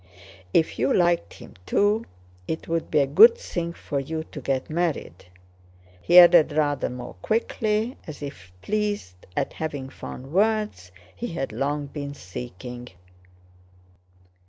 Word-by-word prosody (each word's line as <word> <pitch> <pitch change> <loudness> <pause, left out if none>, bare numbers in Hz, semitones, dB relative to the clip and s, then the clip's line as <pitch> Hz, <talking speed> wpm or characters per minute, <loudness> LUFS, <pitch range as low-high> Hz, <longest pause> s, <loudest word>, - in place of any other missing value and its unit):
"If 160 - +2
you - - +2
liked 175 - +2
him - - -13
too, 210 +3 +2 0.4
it 160 - -4
would 165 0 -2
be 150 - +3
a - - +3
good 460 - +7
thing 170 - -4
for 145 -4 -4
you 160 +4 -4
to 150 - -7
get 130 0 -1
married," 160 - -2 0.8
he 175 - +4
added 175 -3 +8
rather 145 -2 +1
more 125 0 -7
quickly, 220 +1 0
as 155 -1 -8
if 95 -10 -9
pleased 205 - -3
at - - -1
having 145 -4 -4
found 135 +1 -9
words 210 - +1 0.2
he 100 - -4
had 135 -7 -4
long 145 +5 -2
been 140 0 -6
seeking. 120 +5 -8
155 Hz, 135 wpm, -25 LUFS, 130-180 Hz, 0.8 s, added